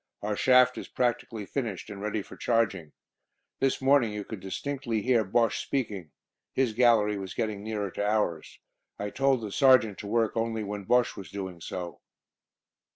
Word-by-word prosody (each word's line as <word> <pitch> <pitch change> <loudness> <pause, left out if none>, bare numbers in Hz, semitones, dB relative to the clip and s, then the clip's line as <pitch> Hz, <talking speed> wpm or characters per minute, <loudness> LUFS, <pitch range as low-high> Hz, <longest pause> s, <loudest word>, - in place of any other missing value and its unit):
"Our 105 0 -1
shaft 125 +4 +4
is - - -8
practically 115 -3 -1
finished, 115 -5 -4
and 100 -1 -8
ready 105 0 -2
for - - -12
charging. 100 -10 0 0.7
This 135 -1 +1
morning 135 -4 +4
you 105 0 -4
could 110 0 -7
distinctly 115 +3 -3
hear 120 -3 +3
Bosche 115 +3 +1
speaking. 105 - -3 0.4
His 130 -4 +1
gallery 110 -3 +3
was 95 -1 -7
getting 110 -3 -2
nearer 105 -3 -3
to 100 - -3
ours. 105 -6 -1 0.4
I 105 0 -4
told 135 0 +2
the 105 -2 -5
Sergeant 130 -5 +4
to 100 - -7
work 115 0 +1
only 115 -1 -1
when 100 -1 -5
Bosche 125 +3 +2
was 95 - -9
doing 95 -4 -6
so." 90 +1 -6
110 Hz, 165 wpm, -28 LUFS, 100-120 Hz, 0.7 s, shaft